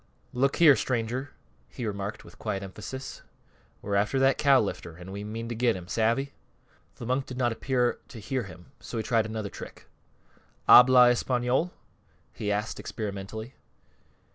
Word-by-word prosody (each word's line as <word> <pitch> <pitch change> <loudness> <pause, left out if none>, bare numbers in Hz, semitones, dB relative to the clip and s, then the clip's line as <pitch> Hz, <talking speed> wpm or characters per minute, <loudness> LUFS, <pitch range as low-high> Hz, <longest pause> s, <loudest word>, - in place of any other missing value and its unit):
"Look 135 +2 +1
here, 155 -5 +7
stranger," 125 +3 -2 0.4
he 120 - -6
remarked, 100 0 -4
with - - -16
quiet 95 0 -3
emphasis, 105 +7 -8 0.6
"we're 100 - -3
after 100 +6 +1
that 135 0 +3
cow 140 -2 +5
lifter, 85 -5 -4
an' 90 +2 -10
we 100 +1 -6
mean 115 +2 -5
to - - -2
get 120 0 +1
him. 90 -1 -8
Savvy?" 115 +7 0 0.6
The 120 - -8
monk 130 +3 -1
did 125 - -7
not 120 -2 +1
appear 125 +1 0
to - - -11
hear 130 +2 -3
him, 90 +5 -13
so 120 - -7
he 110 - -1
tried 110 0 +1
another 110 -2 -4
trick. - - -10 0.8
"Habla 125 0 +9
española?" 125 +6 0 0.6
he 105 - -3
asked, 105 +2 -2
experimentally. 110 +3 -6
115 Hz, 160 wpm, -27 LUFS, 105-130 Hz, 0.8 s, Habla